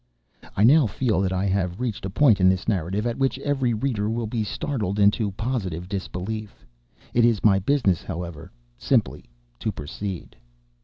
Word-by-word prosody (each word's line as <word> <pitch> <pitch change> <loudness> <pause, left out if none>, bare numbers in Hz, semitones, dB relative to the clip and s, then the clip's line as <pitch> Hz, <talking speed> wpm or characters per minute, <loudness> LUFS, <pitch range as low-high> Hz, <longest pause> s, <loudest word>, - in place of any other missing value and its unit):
I 100 - +4
now 140 +3 +6
feel 110 -1 0
that 95 -1 0
I 95 +1 0
have 95 -2 -1
reached 115 -6 -3
a - - -5
point 110 0 +4
of 95 0 +6
this 95 0 0
narrative 100 +1 -1
at 120 +1 -2
which 135 -1 +1
every 135 -3 0
reader 110 -3 -1
will 115 +1 -1
be 110 0 -2
startled 105 - -3
into 105 +1 +3
positive 95 -7 -3
disbelief. 100 +2 -5 0.5
It 120 - +4
is 115 -3 +3
my 100 -3 +5
business, 100 - +1
however, 85 -3 -7 0.3
simply - - 0 0.3
to - - -1
proceed. 90 +5 -6
105 Hz, 165 wpm, -24 LUFS, 95-120 Hz, 0.5 s, now